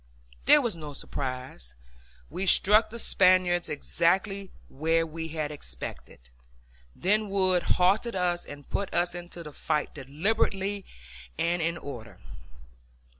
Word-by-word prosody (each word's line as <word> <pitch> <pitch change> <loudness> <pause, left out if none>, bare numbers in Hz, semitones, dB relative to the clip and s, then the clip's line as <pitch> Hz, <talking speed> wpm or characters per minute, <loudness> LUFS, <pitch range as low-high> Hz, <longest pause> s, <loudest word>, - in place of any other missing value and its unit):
There 295 - +7
was 230 -6 -1
no 150 -3 -8
surprise; 130 - -6 0.5
we 190 +1 -4
struck 210 +4 +5
the 235 - -7
Spaniards 185 -4 +3
exactly 190 +6 0 0.2
where 165 +4 +1
we 160 0 -6
had 155 -2 -3
expected; 60 - -8 0.6
then 210 +3 +1
Wood 185 -2 +2 0.2
halted 200 +6 +2
us 175 -1 0
and 145 -1 -11
put 200 - -2
us 175 0 +2
into 175 -1 -8
the 150 -2 -10
fight 150 - -1
deliberately 195 - -1 0.5
and 170 +1 +1
in 165 +1 0
order. 120 -9 -9
175 Hz, 125 wpm, -28 LUFS, 150-195 Hz, 0.6 s, There